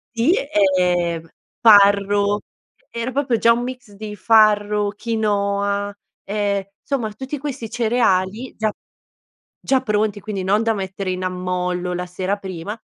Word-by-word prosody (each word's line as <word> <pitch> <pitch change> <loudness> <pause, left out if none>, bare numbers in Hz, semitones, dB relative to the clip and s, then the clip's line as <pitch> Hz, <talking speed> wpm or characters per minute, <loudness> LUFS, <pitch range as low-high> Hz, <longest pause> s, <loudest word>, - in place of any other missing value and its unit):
Sì, 235 +9 +3 0.4
ehm, 175 -2 0 0.3
farro, 205 -1 +5 0.5
era 235 +2 -4
proprio 265 -3 0
già 230 - +4
un 235 +1 +2
mix 250 -3 -7
di 210 +1 -8
farro, 210 0 +3
quinoa, 205 -2 -1 0.3
ehm, 200 -1 -1 0.2
insomma 240 -7 -2
tutti 265 +6 -5
questi 270 -5 -5
cereali 225 -1 0
già 215 -1 0 0.9
già 265 -1 +2
pronti 210 -3 0
quindi 200 -3 -4
non 205 +4 +2
da 225 0 +2
mettere 190 -1 -4
in 185 0 -3
ammollo 180 0 -2
la 180 0 -3
sera 185 +3 -2
prima; 190 +1 -6
205 Hz, 130 wpm, -21 LUFS, 190-225 Hz, 0.9 s, farro